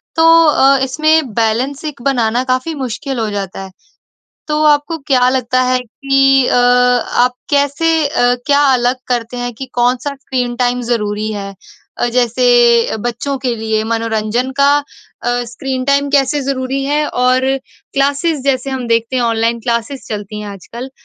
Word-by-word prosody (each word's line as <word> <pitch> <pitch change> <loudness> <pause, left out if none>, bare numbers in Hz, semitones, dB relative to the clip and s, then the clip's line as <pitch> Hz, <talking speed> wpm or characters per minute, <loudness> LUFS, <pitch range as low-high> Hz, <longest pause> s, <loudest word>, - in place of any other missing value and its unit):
तो 325 0 +3 0.2
अ, 275 -2 +4
इसमें 310 -1 +1
बैलेंस 245 +7 -1
एक 285 -5 -6
बनाना 245 -3 +1
काफ़ी 255 +5 -1
मुश्किल 260 -1 -4
हो 220 -1 -1
जाता 195 -2 -5
है। 190 - -10 0.8
तो 300 0 0
आपको 300 +2 +2
क्या 255 -4 +3
लगता 255 -1 0
है 255 0 +1
कि 270 +2 +2
अ, - - +1
आप 245 0 +3 0.2
कैसे 285 +3 +1
अ, 245 -4 +2
क्या 285 0 +3
अलग 245 +1 +1
करते 240 -1 -2
हैं 245 0 -3
कि 265 +4 -7
कौन-सा 250 +3 0
स्क्रीन 255 -3 -3
टाइम 245 0 0
ज़रूरी 210 -2 -1
है? 200 -1 -6 0.4
अ, - - +1
जैसे 240 -1 +3
बच्चों 240 +5 -3
के 255 -2 -2
लिए 220 -1 -1
मनोरंजन 230 +2 -1
का 280 - +5
अ, 290 -3 -9 0.2
स्क्रीन 255 +2 -4
टाइम 280 +1 +2
कैसे 285 +1 +2
ज़रूरी 270 0 -2
है, 295 +2 0
और 255 +1 +2 0.5
क्लासेस 280 +3 0
जैसे 275 -1 0
हम 260 -2 -4
देखते 230 +2 0
हैं 245 - +1
ऑनलाइन 230 0 0
क्लासेस 235 +3 -3
चलती 210 0 -5
हैं 210 - -7
आजकल। 235 +6 -9
250 Hz, 155 wpm, -15 LUFS, 235-275 Hz, 0.8 s, का